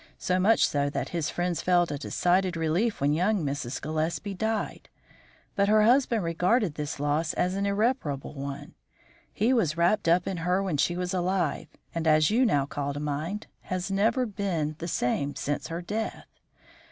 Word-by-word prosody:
So 185 0 0
much 220 +5 +4
so 145 0 0
that - - -3
his 165 -4 -2
friends 175 -1 -1
felt 175 -1 +2
a 145 - -2
decided 180 +3 +1
relief 170 +8 0
when 145 +1 +2
young 185 +2 +1
Mrs. 140 -2 -3
Gillespie 160 +6 -2
died. 220 +3 -3 0.7
But 200 0 +2
her 215 0 +5
husband 240 -2 +3
regarded 180 +3 +1
this 145 -1 -5
loss 150 +2 0
as 180 +1 0
an 200 +1 -1
irreparable 200 - -1
one; 140 -1 -6 0.6
he 230 +5 +2
was 170 - +1
wrapped 175 +3 +2
up 170 +2 +4
in 190 - -3
her 180 +3 +1
when 180 -6 -1
she 175 +5 +1
was 180 0 -2
alive, 180 -4 0 0.3
and, 165 -1 -2
as 155 +2 +4
you 245 +3 +4
now 145 -9 +2
call 140 0 -3
to - - -3
mind, 150 +8 -3 0.2
has 185 +1 -2
never 220 +6 +2
been 185 -8 -2
the 170 - -4
same 140 -3 0
man - - -9
since 145 +1 -3
her 170 +2 -5
death. 215 +5 -4
175 Hz, 180 wpm, -27 LUFS, 150-200 Hz, 0.7 s, her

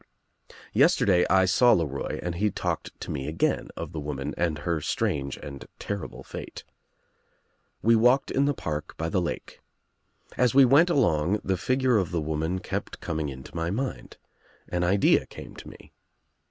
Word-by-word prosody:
* - - -48
« - - -19
* - - -32
Yesterday 90 -3 +4
I 95 -1 +5
saw 120 +6 +5
LeRoy 70 -5 -2
and 90 - -2
he 105 +5 +1
talked - - -4
to - - -5
me 65 - -4
again 80 +1 0
of - - -5
the 80 - -5
woman 70 -2 -4
and 85 -3 0
her 80 +1 -2
strange 70 -2 -1
and 70 -2 -9
terrible 100 -1 -5
fate. - - -8 1.2
We 115 +1 +5
walked 125 +4 +3
in 140 - +2
the 145 0 +1
park 75 -6 -5
by 80 +1 -2
the 90 - +1
lake. 85 - -5 0.8
As 125 +1 +2
we 135 -1 +8
went 145 +8 +5
along 90 - +2
the 95 - 0
figure 130 +4 +2
of 90 -5 -1
the 85 - -1
woman 80 +3 -2
kept - - -5
coming 80 -2 -3
into 65 +2 -10
my 85 0 -1
mind. 130 +8 -4 0.5
An 90 0 -1
idea 95 +3 +3
came - - -11
to - - -10
me. - - -15
90 Hz, 180 wpm, -26 LUFS, 75-115 Hz, 1.2 s, we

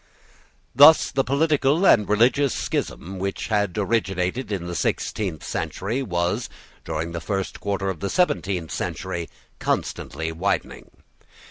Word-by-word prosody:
Thus 150 +3 +7
the 135 - +1
political 150 +3 +2
and 105 - +5
religious 120 +5 +3
schism 95 +2 -3
which 95 +4 -3
had 105 -3 0
originated 100 +1 -1
in 95 -4 -2
the 85 - -5
sixteenth 90 0 -2
century 110 +8 -3
was, 90 +1 -1 0.3
during 80 +1 -3
the 85 0 -5
first 95 0 -3
quarter 100 -1 -2
of 95 -4 -3
the 100 - -2
seventeenth 95 - 0
century, 85 -1 -4 0.3
constantly 80 0 -2
widening. 90 +5 -2
100 Hz, 125 wpm, -23 LUFS, 90-125 Hz, 0.3 s, Thus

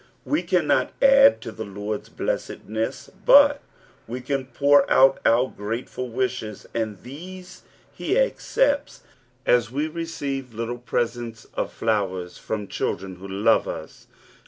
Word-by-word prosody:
We 300 - +1
cannot 180 -6 +1
add 275 0 +6
tu 115 - -6
the 110 - -6
Lord's 105 +1 -5
blessedness, 110 +4 -3
but 285 +3 +7 0.5
■ve 125 +1 -5
can 135 -1 -2
(lour 145 0 +6
out 135 +1 +5
our 120 +3 +4
grateful 115 +4 -4
wishes, 120 -4 -3
and 110 -4 -3
these 180 +8 -10 0.3
he - - -1
accepts, 485 -11 +1 0.4
as 120 -4 +3
we 145 +5 -1
leceive 140 -6 -5
little 115 +2 -4
presents 120 -2 -3
of - - -2
flowers 95 -5 -2
from 105 -2 -4
children 95 0 -3
who 95 +2 -9
love 100 +4 +2
us. - - -8
125 Hz, 130 wpm, -24 LUFS, 110-150 Hz, 0.5 s, but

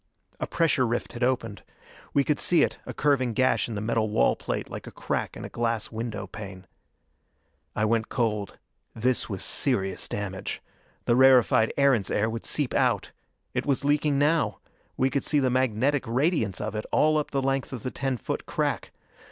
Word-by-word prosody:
A - - -2
pressure 140 -6 +2
rift 120 +1 -2
had 120 - -3
opened. 120 -4 0 0.5
We 140 - +3
could 150 +1 0
see 175 - +4
it, - - -1
a - - -5
curving 130 -5 +2
gash 130 +2 +2
in 115 - -4
the 100 - -3
metal 110 0 0
wall 105 - +3
plate - - -4
like - - -8
a - - -7
crack - - -3
in - - -7
a - - -4
glass 115 -2 -2
window 110 -3 -4
pane. 95 -1 -9 1.1
I 110 - +1
went 115 0 +1
cold. 105 -5 -1 0.4
This 125 +3 0
was 95 -3 -4
serious 95 -9 -1
damage! 100 -1 -4 0.5
The 120 - +3
rarefied 125 -3 +5
Erentz 135 -9 +3
air 110 +2 +1
would 115 0 -5
seep 145 -4 -1
out. - - +1 0.4
It - - -2
was 140 0 +1
leaking 145 0 +2
now: 145 -7 +2 0.4
we 130 +1 +2
could 140 - 0
see 150 - +2
the 130 -2 +2
magnetic 130 +2 +1
radiance 120 - +1
of 105 0 -3
it 110 0 -4
all 155 0 +4
up 150 - -3
the 140 - -1
length 135 0 0
of 125 -5 -6
the 130 - -3
ten 135 -2 -2
foot - - -4
crack. - - -1
120 Hz, 185 wpm, -26 LUFS, 110-140 Hz, 1.1 s, rarefied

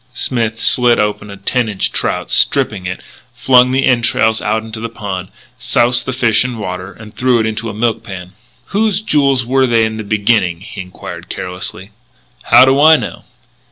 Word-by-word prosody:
Smith 115 -2 -1
slit 120 -1 +3
open 105 0 -2
a 100 - -9
ten 115 +4 -1
inch 100 -3 -1
trout, - - -3
stripped - - +2
it, 90 -1 -6 0.3
flung 125 -1 +4
the 135 +1 +1
entrails 115 -3 +2
out 110 +1 -1
into 110 0 -8
the 115 +1 -5
pond, 95 -5 -6 0.3
soused 120 +1 +2
the - - -1
fish 120 -4 +2
in 125 -2 -5
water, 90 -2 -6
and 105 +2 -13
threw 125 -2 +2
it 110 - 0
into 110 +1 -3
a - - -6
milk 115 0 -1
pan. 95 -4 -9 0.4
"Whose 210 -1 +1
jewels 140 - +1
were 130 +1 +2
they 115 -2 +2
in 110 0 -4
the 110 - -5
beginning?" 100 -4 0
he 100 -1 -8
enquired 90 0 -10
carelessly. 90 +2 -6 0.5
"How 130 - +7
do 135 +2 +3
I 160 +1 +7
know?" - - -7
110 Hz, 185 wpm, -15 LUFS, 100-125 Hz, 0.5 s, How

